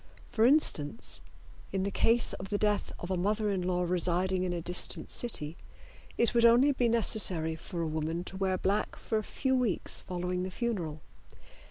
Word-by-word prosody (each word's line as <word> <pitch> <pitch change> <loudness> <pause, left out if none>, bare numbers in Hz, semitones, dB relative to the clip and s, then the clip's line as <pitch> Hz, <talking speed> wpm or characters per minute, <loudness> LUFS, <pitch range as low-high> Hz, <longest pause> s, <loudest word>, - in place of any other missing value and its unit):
For 225 0 +3
instance, 230 - +1 0.5
in 190 -1 -1
the 200 - -1
case 230 +4 +2
of 190 - -7
the 205 - 0
death 210 0 0
of 175 - -6
a - - +1
mother 210 +3 0
in 190 -2 -1
law 180 0 0
residing 180 +1 +1
in 185 -1 -1
a 175 - -2
distant 175 +2 -1
city, 165 -10 0 0.6
it 235 - +2
would 235 -1 +3
only 240 +5 +6
be 245 -3 +1
necessary 190 -8 +3
for 170 +1 -5
a - - -1
woman 160 +2 -2
to 190 - -8
wear 190 -1 0
black 200 +3 -1
for 220 - -2
a - - -5
few 265 +5 0
weeks 245 -7 -1
following 180 0 -3
the 185 - -3
funeral. 185 -8 -3
190 Hz, 185 wpm, -30 LUFS, 175-225 Hz, 0.6 s, only